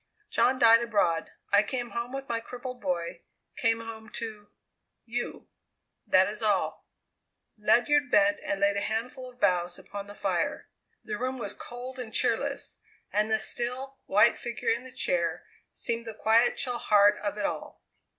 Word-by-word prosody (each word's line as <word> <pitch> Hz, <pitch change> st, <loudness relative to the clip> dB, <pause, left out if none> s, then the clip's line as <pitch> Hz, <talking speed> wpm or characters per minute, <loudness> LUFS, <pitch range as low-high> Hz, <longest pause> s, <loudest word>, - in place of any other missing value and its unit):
"John 255 Hz, +1 st, +3 dB
died 230 Hz, -1 st, +7 dB
abroad; 200 Hz, -8 st, +1 dB, 0.2 s
I 200 Hz, +1 st, +7 dB
came 240 Hz, +2 st, -3 dB
home 235 Hz, +1 st, -3 dB
with 270 Hz, 0 st, -5 dB
my 230 Hz, -1 st, -1 dB
crippled 245 Hz, +1 st, -8 dB
boy; 170 Hz, -3 st, -2 dB, 0.3 s
came 225 Hz, 0 st, +1 dB
home 220 Hz, -1 st, -8 dB
to 215 Hz, -3 st, -6 dB, 0.6 s
you. 240 Hz, +1 st, -4 dB, 0.6 s
That -, -, +5 dB
is -, -, -5 dB
all!" -, -, 0 dB, 0.7 s
Ledyard 285 Hz, +7 st, +3 dB
bent 300 Hz, +1 st, +4 dB
and 300 Hz, -, -2 dB
laid 200 Hz, 0 st, +3 dB
a -, -, 0 dB
handful 250 Hz, +4 st, -3 dB
of 250 Hz, 0 st, -19 dB
boughs 180 Hz, -4 st, +2 dB
upon 200 Hz, 0 st, -8 dB
the 205 Hz, -, -10 dB
fire. -, -, -1 dB, 0.3 s
The 210 Hz, -, -4 dB
room 255 Hz, +1 st, -2 dB
was 240 Hz, -, -4 dB
cold 250 Hz, +2 st, -8 dB
and 235 Hz, -3 st, -6 dB
cheerless, -, -, -1 dB, 0.3 s
and 210 Hz, +1 st, +2 dB
the 220 Hz, -, +3 dB
still, 255 Hz, +4 st, -3 dB
white 205 Hz, +2 st, +5 dB
figure 240 Hz, -1 st, -3 dB
in 235 Hz, +3 st, -1 dB
the 260 Hz, -, -8 dB
chair -, -, -1 dB, 0.3 s
seemed 235 Hz, -1 st, -3 dB
the 220 Hz, -, -6 dB
quiet, 225 Hz, +3 st, +3 dB
chill 245 Hz, -3 st, -2 dB
heart 205 Hz, 0 st, +5 dB
of 205 Hz, 0 st, -3 dB
it 205 Hz, -, -1 dB
all. -, -, -5 dB
230 Hz, 165 wpm, -28 LUFS, 210-250 Hz, 0.7 s, died